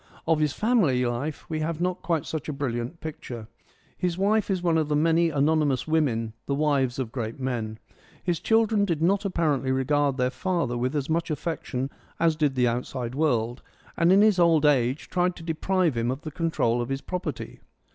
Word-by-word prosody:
Of 160 -1 +2
his 150 -2 +2
family 170 - +2
life 125 +6 -3
we 155 -1 -3
have 155 +1 -2
not 180 +1 -1
quite 165 -5 -1
such 160 -1 -4
a - - -2
brilliant 130 +2 -3
picture. 125 -8 -7 0.5
His 180 -1 -1
wife 210 +2 +2
is 185 -2 0
one 165 -2 +3
of 155 - 0
the 150 - +2
many 165 +2 +3
anonymous 150 -2 +1
women, 125 -9 +1
the 140 - 0
wives 140 -4 +1
of 130 -4 -3
great 115 -1 -4
men. 115 -4 -3 0.5
His 175 -3 0
children 225 -2 +3
did 165 -5 0
not 195 +4 +2
apparently 150 -8 0
regard 140 +1 +1
their 125 0 +1
father 170 -6 -1
with 125 +4 -1
as 140 -2 -1
much 165 +1 0
affection 145 -4 -3 0.3
as 165 -1 +3
did 150 -3 +1
the 125 -1 +3
outside 120 0 -3
world, 125 -5 0 0.3
and 170 +1 +3
in 195 +2 +6
his 215 -4 +4
old 165 -3 +4
age 135 -1 +2
tried 180 0 0
to 165 - -10
deprive 170 -1 0
him 115 +1 0
of 130 +3 -3
the 155 - -6
control 140 -8 0
of 120 - -4
his 135 0 -2
property. 180 -1 -5
150 Hz, 195 wpm, -26 LUFS, 130-170 Hz, 0.5 s, in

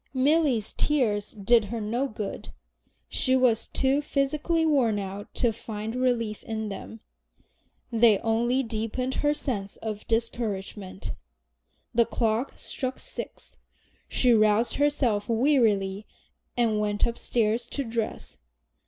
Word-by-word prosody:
Milly's 270 -4 +2
tears 220 -9 +1
did 220 +2 +3
her 230 +3 -4
no 235 +6 -1
good. 215 -5 -6 0.6
She 260 0 +2
was 250 -4 +3
too 270 +2 +1
physically 300 +4 0
worn 260 -9 +3
out 200 +1 -6
to 240 -3 +2
find 220 0 -5
relief 240 -4 0
in 220 -1 -3
them. 210 +2 -8 0.9
They 225 -2 +5
only 240 +3 +1
deepened 230 +3 -2
her 295 0 +2
sense 200 -9 -3
of 215 -2 -6
discouragement. 215 -4 -2 0.8
The 235 -1 +4
clock 230 +3 -1
struck 260 -1 -4
six; - - -8 0.5
she 250 -2 +3
roused 215 +1 +3
herself 255 -8 +1
wearily 220 -6 +2 0.5
and 225 -3 +2
went 205 -1 +1
upstairs 235 0 0
to 280 - -2
dress. 230 -2 -4
230 Hz, 120 wpm, -27 LUFS, 215-255 Hz, 0.9 s, They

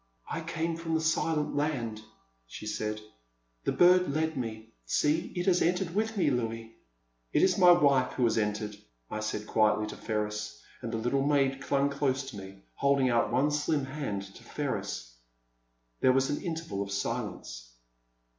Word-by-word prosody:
I 165 - -2
came 165 0 -2
from 165 -1 -2
the - - +2
Silent 160 -1 0
Land, 125 -8 -1 0.5
she - - -9
said; 105 0 -3 0.6
the - - +2
bird 180 0 +5
lead 160 +2 0
me; 110 -3 -5
see, 155 +3 +1
it 175 0 -1
has 180 -2 +3
entered 180 0 +1
with 220 +2 -1
me, 165 -6 +3
lyouis. 115 -2 -2 0.6
It - - +4
is 190 0 +3
my 180 -1 +8
wife 140 -7 +4
who 130 - -1
has 115 -2 +3
entered,* 105 -1 -1 0.2
* - - -34
I 110 - -2
said 110 -1 -3
quietly 105 0 +2
to 105 - -7
Ferris, 105 - -3 0.2
and 115 - -4
the 115 - -1
little 120 +5 0
maid 135 -1 +2
clung 140 +1 +1
close 135 -2 0
to 105 - -9
me, 95 0 -10
holding 140 -2 +2
out 115 0 +2
one 145 +3 +2
slim 150 -1 0
hand 130 -8 -4
to 95 0 -13
Ferris. - - -4 0.9
There 130 - +5
was 135 +1 +2
an 145 - -2
interval 160 - -3
of 100 0 -4
silence. 100 - -4
130 Hz, 175 wpm, -30 LUFS, 110-160 Hz, 0.9 s, my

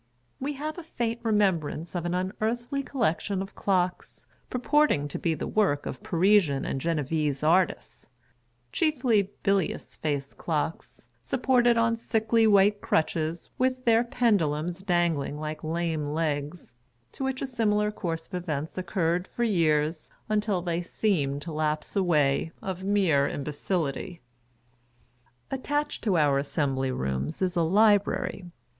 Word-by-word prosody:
We 280 +3 -2
have 305 +4 -5
a - - -8
faint 235 -7 -3
remembrance 190 -8 0
of 175 -1 -2
an 175 - -1
unearthly 230 +8 -2
collection 200 - -1
of 195 +1 -5
clocks, 185 -2 -1 0.2
purporting 255 - +2
to - - -5
be 165 -2 0
the - - -4
svork 190 -10 +1
of 130 - -6
Parisian 175 -5 +3
and 135 - -2
Genevese 150 -2 -1
artists 175 +4 +1 0.3
— 120 0 -43
chiefly 245 - +2
bilious 195 -4 0
faced 140 -3 -3
clocks, 160 0 -3
supported 245 -2 +2
on 230 0 +2
sickly 225 0 +2
white 205 0 +4
crutches, 160 +1 -1
with 255 0 0
their 230 0 +5
pendulums 180 -9 0
dangling 170 -6 0
like 155 0 -5
lame 160 -2 -1
legs 150 -2 -3 0.2
— 120 +1 -42
to - - -6
which 265 0 -1
a - - 0
similar 210 -4 +1
course 165 -5 -4
of - - -23
events 160 -2 -3
occurred 180 -1 0
for 240 - -3
several - - +1
years, 155 -1 +1 0.2
until 210 -4 0
they 170 -1 -1
seemed 145 -7 -1
to 170 - -6
lapse 155 0 -2
away, 160 -5 +2
of 190 -1 -5
mere 185 -8 +3
imbecility. 150 +4 -3 1.3
Attached 290 +3 -2
to 195 -5 +3
our 145 -3 +3
Assembly 135 -2 -1
Rooms 65 - -3
is 185 0 0
a 170 - +2
Library. 200 0 +2
175 Hz, 140 wpm, -27 LUFS, 150-215 Hz, 1.3 s, their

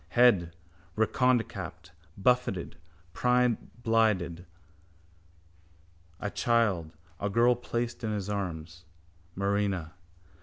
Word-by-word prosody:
Head, 95 -9 +5 0.4
redconecapped, 110 -7 0 0.3
buffeted, 120 -4 +1 0.4
brineblinded. 115 -7 +1 1.7
—A 105 - -2
child, 100 - +1 0.2
a 100 - -1
girl, 120 +4 +4
placed 120 0 -3
in 110 - -1
his 100 -2 -3
arms, 90 -4 -4 0.5
Marina. 100 -4 -1
100 Hz, 75 wpm, -29 LUFS, 90-120 Hz, 1.7 s, Head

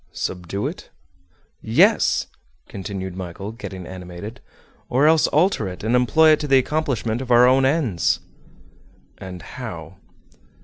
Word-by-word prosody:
"Subdue 90 +2 -4
it?" - - -6 0.7
"Yes," - - +3 0.4
continued 95 -2 -6
Michel, 95 +3 -6
getting 100 -6 -8
animated, 95 +6 -9 0.5
"or 130 +4 +3
else 160 0 +5
alter 155 - +1
it, 90 +1 -8
and 115 +3 +1
employ 125 +6 +5
it 155 - +4
to 150 - -4
the 135 -1 +5
accomplishment 130 -5 -1
of 130 - -7
our 120 0 +6
own 130 +1 +4
ends." 135 - +1 1.0
"And 90 -2 -8
how?" - - -8
115 Hz, 130 wpm, -22 LUFS, 95-135 Hz, 1.0 s, our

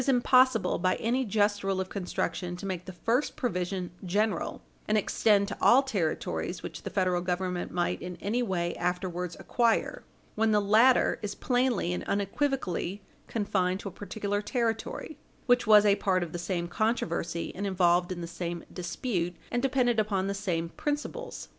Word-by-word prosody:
438 270 -3 +3
impossible, 245 -7 +4
by 185 +1 +2
any 245 +4 0
just 205 -2 +1
rule 195 -1 0
of 190 - -2
construction, 180 -2 -3
to 180 - -8
make 185 -2 -4
the 185 - -7
first 230 +9 0
provision 185 - -2
general, 200 +1 -1 0.2
and 215 - +3
extend 205 -1 +3
to 200 - -4
all 260 +3 +6
territories, 195 - -2
which - - -7
the - - -5
Federal 185 -2 +1
Government 180 0 -2
might 175 -1 -1
in 180 0 -6
any 225 +5 0
way 175 -6 -1
afterwards 180 0 -2
acquire, 235 -2 +1 0.3
when 220 0 +2
the 210 - +4
latter 220 +6 +4
is 205 -1 -4
plainly 245 -8 +1
and - - -3
unequivocally 200 - -1 0.2
confined 190 -4 0
to 200 - -5
a - - -13
particular 205 +2 -3
territory; 230 +6 -2 0.3
which 245 -2 +3
was 210 -1 +8
a 200 -1 +5
part 185 -2 +1
of 170 - -6
the 175 - -4
same 175 0 -2
controversy, 170 -5 -1
and 200 +2 -3
involved 175 -1 +2
in 175 -1 -4
the - - -3
same 170 0 -5
dispute, 180 -1 -2 0.2
and 245 - 0
depended 250 -3 +2
upon 200 -3 0
the 200 - -1
same 175 -5 -2
principles. 295 - -4
200 Hz, 170 wpm, -29 LUFS, 180-225 Hz, 0.3 s, was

